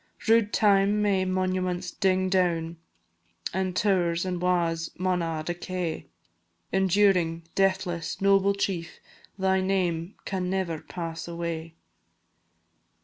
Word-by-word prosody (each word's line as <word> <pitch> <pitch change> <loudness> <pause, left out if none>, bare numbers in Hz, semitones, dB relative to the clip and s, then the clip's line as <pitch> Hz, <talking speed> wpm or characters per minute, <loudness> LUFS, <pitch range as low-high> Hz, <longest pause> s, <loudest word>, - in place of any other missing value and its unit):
Rude 225 -2 +4
Time 200 0 +3
may 195 -2 +2
monuments 185 -1 -1
ding 185 -2 +1
doun, 170 -3 0 0.8
An' 190 0 -1
tow'rs 180 -3 +1
an' 180 -1 -2
wa's 170 -2 0
maun 185 -1 0
a' 165 -2 -2
decay; 175 -2 -4 0.6
Enduring, 190 -3 +2
deathless, 185 -4 0
noble 195 0 +4
chief, 180 -4 -3 0.4
Thy 190 0 +2
name 185 -2 -1
can 185 -2 -2
never 185 -4 -1
pass 165 -1 -6
away! 165 -1 -5
185 Hz, 105 wpm, -27 LUFS, 170-190 Hz, 0.8 s, Rude